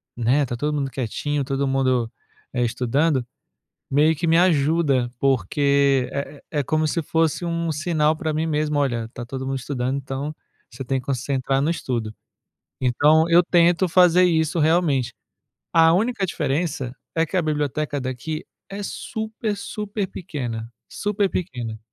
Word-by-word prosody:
né, 125 +5 +2
tá 120 -1 -4
todo 150 +4 -1
mundo 140 -2 -1
quietinho, 140 +4 -2
todo 135 +1 -1
mundo, 130 -3 +1 0.4
eh, 125 -1 +1
estudando, 130 +4 +1 0.7
meio 150 +4 +4
que 170 - -2
me 165 +1 +4
ajuda, 150 -6 +2
porque 140 +2 +2
é 140 0 -5
é 150 -2 0
como 155 +3 0
se 165 +3 -1
fosse 160 +2 0
um 170 -1 -1
sinal 155 0 +1
pra 155 0 -2
mim 155 +2 -1
mesmo: 150 -1 0
"Olha, 120 -5 0
tá 120 - -6
todo 130 +1 -5
mundo 135 0 -2
estudando, 130 0 -2
então 135 +2 -4 0.4
você - - -7
tem 135 +2 0
que 125 - -8
concentrar 135 0 0
no 150 - +1
estudo". 120 -9 -2 0.7
Então, 150 +6 +4
eu 170 +1 +6
tento 175 +1 +3
fazer 180 0 +6
isso 160 -1 +1
realmente. 155 -5 +2 0.6
A 165 0 +6
única 215 +3 0
diferença 150 -5 -2 0.2
é 165 0 +2
que 165 - -6
a - - +3
biblioteca 150 -1 -1
daqui 130 +5 -4 0.2
é 200 +1 -6
super, 220 +1 -4
super 210 0 -4
pequena. 120 -11 -5 0.2
Super 205 -1 0
pequena. 120 - -4
145 Hz, 155 wpm, -23 LUFS, 130-165 Hz, 0.7 s, eu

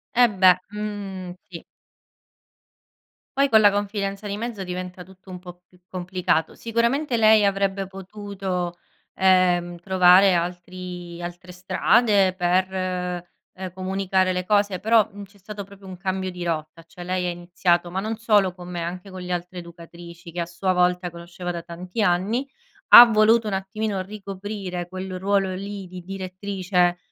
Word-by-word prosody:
Eh 245 0 +6
beh, 185 -3 +5 0.2
mhmm, 200 -3 -5 0.2
sì. 170 -2 -9 1.7
Poi 280 - +4
con 220 -1 +6
la 205 -1 +6
confidenza 200 0 -3
di 200 - -3
mezzo 225 -3 -4
diventa 180 0 -6
tutto 190 +1 -18
un 180 -1 -7
po' 175 0 -12
più 180 - -25
complicato. 180 -3 -1
Sicuramente 235 +4 0
lei 220 -2 +5
avrebbe 195 -1 0
potuto, 190 -2 -5 0.4
ehm, 180 -2 +3
trovare 185 +1 +5
altri 175 0 -5
altre 175 +1 -8
strade 190 +2 +2
per, 185 0 +1
ehm, 180 -1 -3 0.5
comunicare 190 0 0
le 180 0 -3
cose. 205 -2 +1
Però, 220 +2 +4
uhm, 205 0 -9
c'è 200 +1 -23
stato 205 +1 -8
proprio 200 0 -16
un 185 - -7
cambio 190 0 -3
di 180 -1 -7
rotta, 165 0 -4
cioè 175 +2 -11
lei 180 0 -1
ha - - 0
iniziato 175 0 0
ma 190 - -2
non 220 +2 -3
solo 210 -5 +3
con 180 -1 -11
me 175 -1 -4
anche 180 +3 -6
con 185 -1 -8
le 180 0 -6
altre 180 +1 -5
educatrici 170 0 -12
che 175 - -6
a - - -1
sua 185 +2 -1
volta 180 0 +1
conosceva 175 +1 -7
da 170 -1 -5
tanti 180 +5 -6
anni, 210 +8 +1 0.4
ha 240 - +13
voluto 220 0 +4
un 205 - -2
attimino 195 +1 -2
ricoprire 195 -2 -6
quel 185 0 -6
ruolo 195 0 +1
lì 200 +1 -6
di 180 0 -9
direttrice 185 -1 -1
185 Hz, 155 wpm, -23 LUFS, 180-200 Hz, 1.7 s, ha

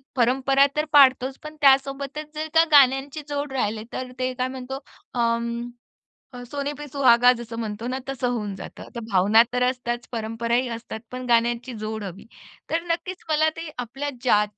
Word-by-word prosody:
परंपरा 270 +2 +3
तर 300 +1 +1
पाळतोच, 265 -2 +5
पण 305 0 -8
त्यासोबतच 275 +2 +2
जर 310 +1 -3
का 325 0 +7
गाण्यांची 275 +1 +4
जोड 290 -1 -3
राहिले 220 -4 -1
तर 255 -1 -5
ते 255 0 -1
काय 255 0 -1
म्हणतो 260 0 -6 0.4
अं. 235 0 -1 0.7
अ, 245 0 -8
"सोने 285 0 -2
पे 295 0 -7
सुहागा" 250 -3 +5
जसं 230 -1 -7
म्हणतो 220 +1 -4
ना 255 +1 -2
तसं 260 -2 -1
होऊन 210 -5 -3
जातं. - - -10
तर 235 - -3
भावना 205 +5 +6
तर 250 0 +1
असतात, 245 -2 -3
परंपराही 230 +2 -1
असतात, 225 -1 -8
पण 255 0 -6
गाण्यांची 235 +1 +2
जोड 220 0 -4
हवी. 195 +1 -8 0.4
तर 330 - 0
नक्कीच 365 +2 -4
मला 310 0 +3
ते 330 -1 -6
आपल्या 260 +4 -4
ज्या 210 -5 +4
255 Hz, 170 wpm, -24 LUFS, 235-280 Hz, 0.7 s, का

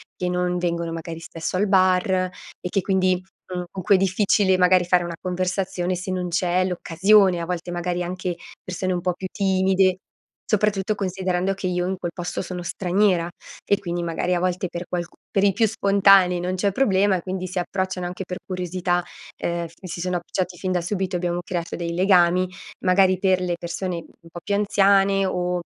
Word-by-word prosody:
che 180 - -2
non 180 0 0
vengono 170 -1 -2
magari 165 0 -6
spesso 165 +1 -4
al 205 +3 +2
bar 185 -1 +3 0.5
e 180 - -4
che 195 - +1
quindi, 185 -1 +1 0.3
mhmm, 180 0 -3
con 190 - -6
cui 200 +3 +5
è - - +5
difficile 190 0 +3
magari 180 0 +4
fare 180 0 +3
una 170 -1 -5
conversazione 185 0 -1
se 180 +1 -5
non 180 -1 -2
c'è 180 +1 +1
l'occasione. 185 +1 +3
A - - -3
volte 175 0 -4
magari 175 0 -2
anche 180 0 -3 0.3
persone 185 +1 -2
un 175 - -2
po' 180 0 0
più 185 +2 -6
timide. 190 -1 +2 0.5
Soprattutto 210 -1 +1
considerando 185 -1 -1
che 195 -1 -4
io 180 0 0
in 190 - -1
quel 175 -1 -4
posto 175 0 -4
sono 180 -1 -5
straniera, 180 0 +1 0.4
e 200 - +2
quindi 175 -3 -3
magari 170 +2 -1
a - - 0
volte 185 0 0
per 175 +1 -5
qualcu 175 -1 -4 0.2
per 195 - +2
i 200 - +4
più 225 +3 +3
spontanei 195 -3 +4
non 180 +1 -2
c'è 200 +2 +1
problema 200 -5 +3
e - - -6
quindi 185 +1 -4
si 185 - -7
approcciano 185 0 -2
anche 180 +2 -5
per 180 0 -5
curiosità. 180 -1 -1 0.4
Ehm, 170 0 -2
mi 185 - -8
si 170 - -5
sono 180 0 -1
approcciati 175 +1 -3
fin 185 +2 -2
da 180 - +1
subito, 190 +1 -2
abbiamo 175 0 -1
creato 175 -2 -4
dei 170 -1 -3
legami, 180 0 +4 0.4
magari 185 0 +4
per 190 -1 +3
le 180 -1 -1
persone 175 +2 -4
un 170 0 -13
po' 175 - -8
più 205 - -2
anziane 195 -1 +3
o 180 -1 -1
180 Hz, 195 wpm, -23 LUFS, 175-190 Hz, 0.5 s, cui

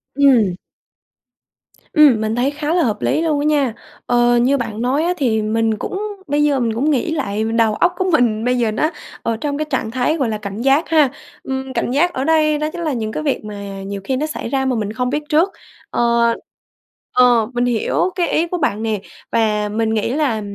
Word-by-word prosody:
Ừm. 245 -10 +4 1.4
Ừm. 290 -9 +6
Mình 220 +1 -1
thấy 255 +3 +1
khá 295 +2 -2
là 350 -2 +3
hợp 210 -3 -1
lý 315 - +1
luôn 310 -3 +1
á 290 - -1
nha. 285 -6 +2 0.3
Ờ, 240 0 +3
như 265 +4 +3
bạn 225 -2 -4
nói 265 +5 +1
á 350 +2 +1
thì 230 -7 +1
mình 220 0 0
cũng 380 - -4 0.3
bây 290 +1 +1
giờ 285 -3 +2
mình 230 -2 0
cũng 270 +7 0
nghĩ 295 +4 0
lại 220 -9 -2
đầu 225 -1 +1
óc 350 +7 +2
của 375 0 0
mình 235 -6 +2
bây 250 0 +2
giờ 230 -3 +1
nó 305 +8 +1 0.3
ở 230 -1 -1
trong 285 -1 -2
cái 310 - -1
trạng 260 -5 -2
thái 255 +6 0
gọi 260 -6 0
là 215 - -2
cảnh 205 +1 -6
giác 275 +5 +2
ha. 310 -5 +4 0.3
Ừm, 265 0 -4
cảnh - - -1
giác 335 +7 +2
ở 260 - -2
đây 310 -1 +3
đó 305 +1 -1
chính 345 - -6
là 310 -4 -1
những 220 -2 -3
cái 310 - -4
việc 275 -7 -1
mà 200 -2 -7
nhiều 200 0 -5
khi 265 - -1
nó 300 - -1
xảy 305 - -5
ra 270 -1 0
mà 260 -1 +1
mình 215 -1 -2
không 250 +1 -1
biết 295 +2 -2
trước. 325 +5 +3 0.4
Ờ 235 -1 +2 0.8
Ờ, 245 -3 +5
mình 245 0 +1
hiểu 245 +9 0
cái 355 -2 +1
ý 335 +2 +1
của 360 - -3
bạn 225 -9 -1
nè, 215 -3 -1 0.3
và 210 -2 +1
mình 220 +1 0
nghĩ 220 +2 0
là 270 -7 0
250 Hz, 225 wpm, -19 LUFS, 220-295 Hz, 1.4 s, Ừm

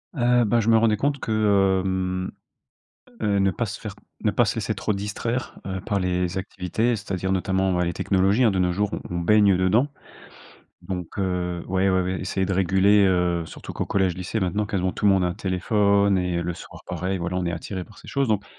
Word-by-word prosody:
Heu, 120 -2 +3
bah, 115 +3 +2
je 115 0 +1
me 115 - +6
rendais 110 -1 +3
compte 140 +4 0
que, 110 - -4 0.5
hem, 95 0 -2 0.9
heu, 100 -2 +1
ne 95 0 +3
pas 115 - -2
se 100 - -6
faire 105 -2 -7 0.3
ne 105 - +2
pas 120 - +3
laisser 110 -1 -2
trop 105 +1 -1
distraire, 105 +5 -3
heu, 95 0 -3
par 100 -3 -1
les 90 0 -1
activités, 105 +5 -1
c'est-à-dire, 95 -2 -3
notamment, 95 0 +1
bah, 90 0 +1
les 85 - -2
technologies, 100 +7 +2
hein, 115 - +5
de 95 - -1
nos 90 -1 +2
jours, 100 +2 -1 0.2
on 90 - -4
on - - -1
baigne 100 +2 +4
dedans. 100 +9 +3 1.0
Donc 90 0 -6
heu 90 -2 -1
ouais, 95 +1 +1
ouais, 95 0 +2
ouais, 90 +1 -2
essayer 95 0 -1
de 95 - -1
réguler, 95 +2 +4
heu, 90 -3 +1
surtout - - -9
qu'au - - -2
collège-lycée, 95 +2 -1
maintenant, 100 +3 0
quasiment 95 -2 -1
tout - - -6
le 100 - +6
monde 95 -2 +2
a - - +2
un 90 - -2
téléphone 100 +1 +2
et 90 -1 0
heu, - - -1
le 85 0 -3
soir - - -11
pareil, 95 +1 -2
voilà, 90 +1 -3
on 90 - -1
est 85 - -1
attiré 90 +2 -5
par 105 - -18
ces - - -15
choses. 140 -2 0
Donc, 105 -2 +1
95 Hz, 220 wpm, -24 LUFS, 90-105 Hz, 1.0 s, me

